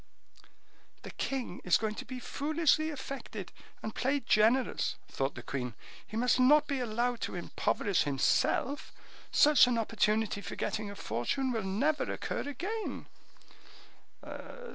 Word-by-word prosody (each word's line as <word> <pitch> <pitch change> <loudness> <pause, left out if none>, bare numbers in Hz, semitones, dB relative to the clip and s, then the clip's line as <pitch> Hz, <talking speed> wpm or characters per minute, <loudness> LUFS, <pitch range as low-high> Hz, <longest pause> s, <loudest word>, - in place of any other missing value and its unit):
"The - - -7
king 260 -9 -3
is 180 - +4
going 220 -1 -2
to - - -7
be 255 0 -6
foolishly 310 +3 +1
affected 265 - -6 0.3
and 220 - -4
play 275 +3 +1
generous," 235 +1 +2
thought 135 +1 -2
the 120 - -8
queen; 125 -2 -4 0.3
"he 215 - -5
must 250 +2 +3
not 290 +4 +6
be 280 -2 -2
allowed 240 0 -1
to - - -3
impoverish 180 +2 0
himself; 145 - +1 0.4
such 295 -3 +7
an 245 -1 +1
opportunity 215 -2 +1
for 180 - -6
getting 215 -1 -2
a 200 - -8
fortune 255 - -1
will 225 -2 -1
never 225 +11 0
occur - - -3
again." 405 - -4
240 Hz, 135 wpm, -31 LUFS, 205-275 Hz, 0.4 s, such